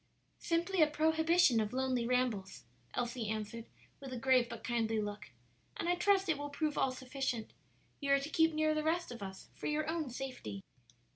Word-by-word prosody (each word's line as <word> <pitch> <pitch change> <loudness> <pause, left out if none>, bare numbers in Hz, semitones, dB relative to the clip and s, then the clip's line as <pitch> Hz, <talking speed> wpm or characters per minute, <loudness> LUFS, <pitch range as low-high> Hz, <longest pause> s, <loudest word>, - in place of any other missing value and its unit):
"Simply 345 +2 +1
a 310 - +7
prohibition 320 -3 +4
of 215 +1 -1
lonely 255 -2 0
rambles," 240 -6 0 0.3
Elsie 240 -2 -2
answered, 220 +1 -4 0.3
with 270 -2 -8
a 255 - -4
grave 250 -1 +3
but - - -7
kindly 225 -2 0
look; 205 -2 -4 0.5
"and - - -2
I 350 - +4
trust 385 +2 +3
it 315 -4 +1
will 290 0 -4
prove 300 +1 -1
all 265 - +2
sufficient; 255 -3 -3 0.5
you 280 -1 -1
are 275 - +6
to 280 +2 -5
keep 325 0 +4
near 310 0 +2
the 310 - 0
rest 325 0 0
of 235 -3 -8
us 190 -1 -8
for - - -5
your 305 +1 0
own 320 -3 -1
safety." 245 - -6
265 Hz, 190 wpm, -34 LUFS, 235-315 Hz, 0.5 s, a